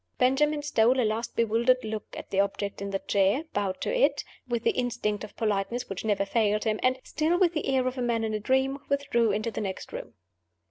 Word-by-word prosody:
Benjamin 290 +4 +2
stole 255 -3 +3
a 245 - +3
last 220 +2 -2
bewildered 235 +3 +2
look 220 -1 -4
at - - -9
the 195 - +1
object 200 0 -1
in 200 - -3
the 195 - 0
chair; 200 +8 +1
bowed 195 -2 -1
to - - -1
it, - - +2 0.2
with 235 -2 -2
the - - +3
instinct 240 -5 -2
of 215 - -9
politeness 215 +2 -1
which 195 - -5
never 205 -2 +1
failed 210 0 +1
him; 215 -1 0
and 255 0 +2
(still 320 +3 0
with 355 -2 +3
the 310 - -2
air 265 -1 +2
of 255 +1 -3
a - - -1
man 235 -2 0
in 220 -1 -1
a 215 - -1
dream) 265 +5 +1
withdrew 275 -6 +2
into 220 +2 -1
the 220 - -4
next 190 -2 -5
room. 120 - -7
230 Hz, 225 wpm, -27 LUFS, 210-260 Hz, 0.2 s, stole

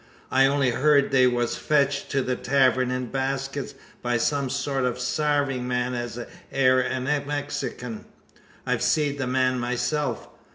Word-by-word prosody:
I 135 +1 +5
on'y 135 -2 +2
hyurd 140 +2 +3
they 130 -2 +5
wur 120 -1 +1
fetched 140 +2 0
to 135 -2 0
the 125 0 -1
tavern 130 -1 +2
in 125 -1 -3
baskets, 135 0 -3 0.3
by 120 -1 0
some 140 +2 0
sort 140 0 -1
o' 125 -1 +1
a 125 - -11
sarving 145 -1 0
man 125 0 -1
as 120 -1 -4 0.3
air 130 -1 +4
a 130 - -2
Mexikin. 140 -4 -3 0.6
I've - - 0
seed 145 -2 +1
the 135 - -1
man 130 0 +1
myself. 125 +2 -2
130 Hz, 155 wpm, -25 LUFS, 125-140 Hz, 0.6 s, I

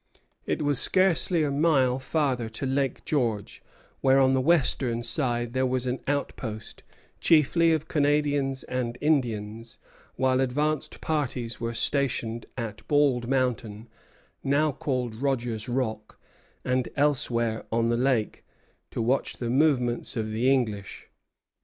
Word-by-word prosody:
It - - -1
was 145 -3 +1
scarcely 185 -3 +2
a 145 - 0
mile 140 -4 +2
farther 130 -4 -1
to 110 +5 -5
Lake 135 -1 -1
George, 115 -9 -1 0.4
where 135 0 +4
on 130 0 +4
the 130 - +2
western 130 -6 +1
side 120 -1 -2
there 130 0 +1
was 130 0 -1
an 125 0 -2
outpost, 125 -6 -4 0.4
chiefly 165 +1 +4
of 160 -1 0
Canadians 145 -3 +1
and 125 -1 -3
Indians; 115 -6 -1 0.4
while 130 0 +2
advanced 145 +4 -1
parties 125 -7 -2
were 115 0 -3
stationed 120 -3 -1
at 115 -4 -5
Bald 140 -5 +2
Mountain, 120 -4 -1 0.5
now 145 +3 +2
called 130 -4 -2
Rogers 125 -4 -1
Rock, 110 -4 -3 0.5
and 125 -1 0
elsewhere 120 -6 0
on 115 0 +1
the 120 - +2
lake, 125 -4 0 0.5
to 115 - -3
watch 130 +4 0
the 120 -1 -3
movements 125 -5 +1
of 110 -1 -2
the 120 +5 +2
English. 110 -7 -2
130 Hz, 130 wpm, -26 LUFS, 115-145 Hz, 0.5 s, where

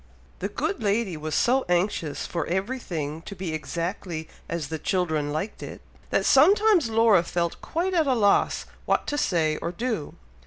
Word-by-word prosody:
The - - -2
good 400 - -2
lady 205 -3 0
was 155 0 -4
so 255 +2 +3
anxious 175 -4 0
for 170 - -3
everything 175 - -3
to 200 - -9
be 185 -4 -4
exactly 165 0 -4 0.2
as 165 -4 -3
the 160 -1 -4
children 160 -5 0
liked 160 +8 -4
it, - - -7 0.3
that - - +1
sometimes 380 - +5
Laura 220 -4 +5
felt 170 0 -2
quite 360 +3 -2
at 325 -4 +2
a 260 - +3
loss 205 -3 +2 0.2
what - - +2
to 290 - -2
say 160 - +1
or 170 - -3
do. 220 -4 -3
185 Hz, 165 wpm, -25 LUFS, 160-235 Hz, 0.3 s, sometimes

